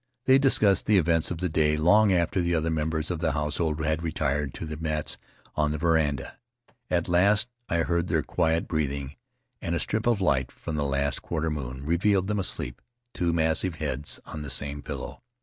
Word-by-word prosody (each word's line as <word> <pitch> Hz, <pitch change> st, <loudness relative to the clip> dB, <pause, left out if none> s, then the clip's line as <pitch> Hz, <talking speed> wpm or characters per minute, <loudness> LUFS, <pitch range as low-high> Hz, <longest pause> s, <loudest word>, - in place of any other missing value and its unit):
They 135 Hz, +1 st, +6 dB
discussed 105 Hz, -8 st, +3 dB
the 105 Hz, -1 st, +5 dB
events 80 Hz, -2 st, +2 dB
of 90 Hz, -, -3 dB
the 90 Hz, +2 st, -1 dB
day 75 Hz, -2 st, +2 dB
long 100 Hz, +7 st, +5 dB
after 90 Hz, +1 st, +1 dB
the 85 Hz, 0 st, +1 dB
other 80 Hz, 0 st, 0 dB
members 80 Hz, +1 st, -1 dB
of 85 Hz, -, -2 dB
the 80 Hz, -2 st, 0 dB
household 75 Hz, +1 st, -1 dB
had 80 Hz, +1 st, 0 dB
retired 75 Hz, -3 st, -1 dB
to -, -, -5 dB
their 75 Hz, -1 st, -6 dB
mats 75 Hz, -1 st, -2 dB, 0.3 s
on 75 Hz, -1 st, +1 dB
the 75 Hz, -, -2 dB
veranda. 80 Hz, -3 st, 0 dB, 0.5 s
At 85 Hz, -2 st, +1 dB
last 100 Hz, +6 st, +3 dB, 0.2 s
I 85 Hz, 0 st, +2 dB
heard 85 Hz, +1 st, 0 dB
their 80 Hz, -3 st, +1 dB
quiet 80 Hz, 0 st, 0 dB
breathing, 70 Hz, -2 st, -2 dB, 0.5 s
and 85 Hz, -, -1 dB
a -, -, 0 dB
strip 110 Hz, +2 st, -1 dB
of 115 Hz, -4 st, +3 dB
light 65 Hz, -9 st, +1 dB
from 80 Hz, -, -7 dB
the 75 Hz, -1 st, 0 dB
last 70 Hz, 0 st, -1 dB
quarter 80 Hz, -1 st, -2 dB
moon 65 Hz, -2 st, -5 dB
revealed 95 Hz, +4 st, +2 dB
them 105 Hz, +1 st, -1 dB
asleep, 65 Hz, -9 st, -2 dB, 0.3 s
two 85 Hz, -1 st, 0 dB
massive 80 Hz, +2 st, +1 dB
heads 75 Hz, -2 st, -3 dB
on 75 Hz, -, -7 dB
the 75 Hz, -, -6 dB
same 70 Hz, +1 st, -2 dB
pillow. -, -, -7 dB
80 Hz, 195 wpm, -27 LUFS, 75-90 Hz, 0.5 s, They